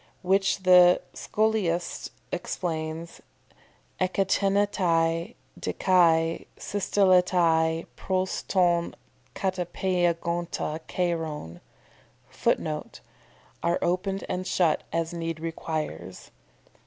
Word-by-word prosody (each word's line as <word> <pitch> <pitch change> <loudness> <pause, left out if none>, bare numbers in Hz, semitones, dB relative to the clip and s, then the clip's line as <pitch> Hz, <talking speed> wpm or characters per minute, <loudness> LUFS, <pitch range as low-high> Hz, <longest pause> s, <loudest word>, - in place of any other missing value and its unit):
"] - - -37
Which 195 +1 +2
the 180 -1 +7
Scholiast 205 -6 -1 0.2
explains, 160 -1 -4 0.8
ekteinetai 185 -3 +1 0.2
de - - -3
kai 165 -3 +3
systelletai 180 -5 +2
pros 185 0 -1
ton 175 -3 +1 0.4
katepeigonta 175 -3 -1
kairon. 160 - -3 0.7
[Footnote: - - -2 0.6
"Are 170 +1 +1
opened 185 +2 -1
and 185 +1 -3
shut 170 -4 +2
as 165 0 -1
need 165 -1 -4
requires." 160 - -5
175 Hz, 75 wpm, -26 LUFS, 165-185 Hz, 0.8 s, the